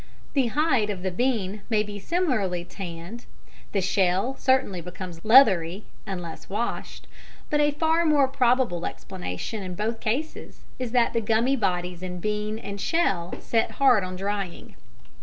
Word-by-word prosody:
The 270 -4 +3
"hide" 255 -4 +2
of 190 -3 -4
the 185 - -1
bean 210 -2 -1
may 215 -2 +3
be 205 -1 -7
similarly 215 - 0
"tanned" 180 +4 -8 0.4
the 200 - +1
shell 190 +6 +1
certainly 260 -11 +1
becomes 180 -1 -8
leathery 205 -6 +5 0.2
(unless 175 -4 -6
washed) 215 +5 -3 0.5
but 295 - +3
a 295 0 +4
far 320 +3 +2
more 295 -4 +4
probable 250 -9 +1
explanation, 185 - -5
in 185 -2 -5
both 225 +4 -2
cases, 270 +9 -3 0.2
is 250 -2 -3
that 245 -2 +3
the 230 - +1
gummy 230 +5 +2
bodies 180 -5 -1
in 180 -1 -5
bean 210 +2 -2
and 200 -3 -6
shell 195 - 0
set 225 -1 0
hard 255 -8 +5
on 185 0 -5
drying. 195 -1 -4
210 Hz, 150 wpm, -26 LUFS, 185-255 Hz, 0.5 s, leathery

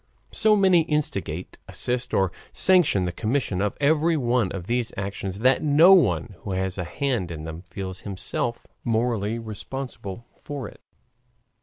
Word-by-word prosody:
So 215 -1 +4
many 190 -4 +5
instigate, 100 - -2
assist, 125 0 -2
or 95 -2 +2 0.2
sanction 170 - +4
the 90 - -1
commission 110 -1 -1
of 105 0 -1
every 160 +3 +3
one 120 -6 +1
of 90 -3 -5
these 120 +2 -1
actions 100 0 -4
that 130 +2 +4
no 155 +5 +7
one 105 - +2
who 100 - -5
has 95 0 -2
a - - -1
hand 115 0 -2
in 80 -2 -6
them 80 +1 -7
feels 95 0 -7
himself 105 +4 -3 0.2
morally 115 -2 0
responsible 115 -1 -7
for 140 -6 -6
it. - - -14
115 Hz, 150 wpm, -25 LUFS, 95-140 Hz, 0.2 s, no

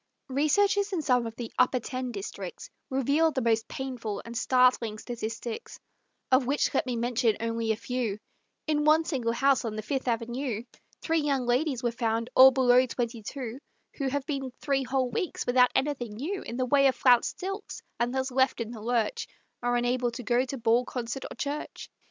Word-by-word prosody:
Researches 395 +9 +2
in 330 -4 -1
some 250 -3 +2
of 225 - -8
the 235 -1 -7
"Upper 255 0 +4
Ten" 255 +1 -4
districts 195 -3 -7 0.2
Reveal 280 +5 +2
the 270 -4 -2
most 225 -1 +1
painful 245 -6 -4
and 235 0 -8
startling 250 -3 +3
statistics, 230 0 -6 0.5
Of 260 -1 +4
which 285 +2 +1
let 270 - +1
me 250 - -1
mention 235 -1 +1
only 230 0 -1
a - - +1
few: 235 -2 -3 0.5
In 300 -1 +1
one 310 +2 +4
single 255 -8 -1
house 275 +2 +3
on 225 -2 -3
the 215 - -4
Fifth 265 +4 -2
Avenue, 235 0 -2 0.4
Three 325 0 +2
young 280 -4 0
ladies 255 +1 0
were 240 - +1
found, 230 0 -1
all 260 +1 +10
below 255 -1 +4
twenty 235 -2 -3
two, 250 +2 -6 0.4
Who 275 - 0
have 275 0 -2
been 275 -3 -3
three 275 -2 0
whole 260 -1 0
weeks 315 +9 -2
without 250 0 +5
anything 265 -6 -1
new 345 - -3
In 235 - -6
the 255 - +1
way 275 +2 +4
of 260 - +2
flounced 245 -2 +3
silks, 390 +3 -5 0.2
and 240 +1 +1
thus 265 0 -2
left 260 0 +2
in 230 -1 -4
the 225 -3 -8
lurch, 240 - -1 0.3
Are 245 0 +1
unable 245 0 +1
to 245 +1 -6
go 245 +2 +2
to 270 +1 -5
ball, 235 +1 +3
concert 245 +1 -5
or - - -9
church. 290 +1 -5
250 Hz, 190 wpm, -28 LUFS, 235-275 Hz, 0.5 s, all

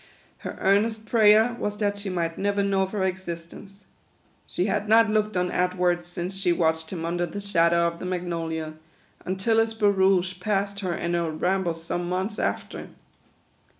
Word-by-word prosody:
Her - - -7
earnest 215 +3 +2
prayer 220 +1 +5
was 210 0 -3
that 205 -1 0
she 200 -1 -4
might 170 -2 -2
never 200 0 0
know 195 -1 +1
of 190 0 -1
her 205 -3 -1
existence. 185 +2 -6 0.6
She 180 - -1
had 205 +1 -1
not 225 0 +5
looked 215 -2 0
on 180 0 0
Edward 180 -1 0
since 175 +1 -5
she 190 -2 +1
watched 160 -2 0
him 165 -3 -4
under 175 +1 -1
the 185 +5 -6
shadow 170 -4 +2
of 170 0 -2
the - - -6
magnolia, 165 -3 -3 0.5
until 190 +5 +1
his 225 0 +1
barouche 190 -3 +2
passed 200 +1 -1
her 185 -4 -2
in 170 0 -2
her 170 -1 0
rambles 170 +1 -1
some 175 +1 -3
months 190 +4 -2
after. - - -3
185 Hz, 170 wpm, -25 LUFS, 175-205 Hz, 0.6 s, prayer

